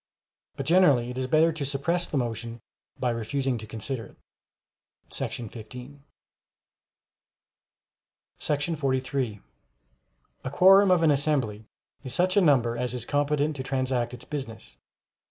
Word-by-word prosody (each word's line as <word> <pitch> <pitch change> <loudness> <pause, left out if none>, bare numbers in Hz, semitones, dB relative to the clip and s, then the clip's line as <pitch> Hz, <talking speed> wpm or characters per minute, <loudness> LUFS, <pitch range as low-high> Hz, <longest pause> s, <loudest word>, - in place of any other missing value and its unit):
But - - -5
generally 145 -9 +4
it 125 - -7
is 130 - -2
better 160 +4 +4
to 155 -2 -4
suppress 145 +6 -1
the 145 - -2
motion 115 -1 -3 0.4
by 125 -2 +1
refusing 125 +2 -2
to 110 - -9
consider 115 +3 -5
it - - -20 0.9
[§ 125 +4 -6 2.5
15]. 150 +2 0
43. 130 -5 -1 1.0
A - - -3
Quorum 195 +6 +6
of 180 -2 +4
an 160 - +5
assembly 135 -7 0 0.4
is 130 -3 -5
such 185 +1 +2
a 200 - +5
number 125 -8 +3
as 125 +1 -2
is 120 -2 -4
competent 145 +2 0
to - - -3
transact 130 -2 -1
its 120 - -13
business. 135 -7 -7
135 Hz, 130 wpm, -26 LUFS, 120-150 Hz, 2.5 s, Quorum